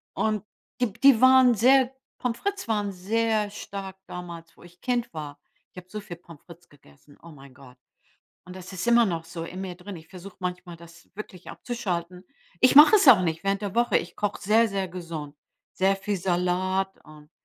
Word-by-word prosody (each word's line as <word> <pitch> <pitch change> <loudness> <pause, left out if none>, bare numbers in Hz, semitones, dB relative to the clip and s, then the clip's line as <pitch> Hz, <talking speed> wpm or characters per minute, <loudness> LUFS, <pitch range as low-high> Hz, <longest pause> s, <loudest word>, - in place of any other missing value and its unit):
Und 215 -2 -1 0.4
die 245 -5 +1
die 250 +1 +5
waren 260 -1 +7
sehr 255 +4 +4 0.3
Pommes 235 -2 -3
frites 400 -1 -3
waren 210 -3 -1
sehr 215 +3 -1
stark 195 -2 -8
damals, 170 -2 -9
wo - - -17
ich 175 0 -18
Kind 245 -2 -2
war. 145 -2 -7 0.3
Ich - - -24
habe 180 0 -10
so 210 +1 -6
viel 190 -4 -9
Pommes 165 -3 -16
frites 175 0 -16
gegessen, 140 - -21
oh 170 - -13
mein 140 -4 -15
Gott. 130 -2 -17 0.7
Und 180 0 -11
das 185 +1 -10
ist 185 +2 -5
immer 235 -1 +5
noch 165 -4 -3
so 165 0 -7
in 185 +2 -8
mir 185 -2 -6
drin. 190 +2 -9
Ich 160 0 -14
versuche 190 +1 -12
manchmal, 180 -1 -5
das 170 0 -16
wirklich 190 -3 -10
abzuschalten. 180 -6 -5 0.3
Ich 255 +6 +4
mache 300 +9 +9
es 400 - +2
auch 240 -8 +9
nicht 165 +1 -2
während 195 +1 0
der 205 +1 -5
Woche. 240 0 +3
Ich - - -9
koche 205 0 -2
sehr, 220 +4 +4
sehr 195 -2 -3
gesund, 165 -5 -7 0.4
sehr 195 +1 +2
viel 200 +1 -3
Salat 185 +1 -1
und, 150 0 -16
185 Hz, 195 wpm, -25 LUFS, 170-220 Hz, 0.7 s, mache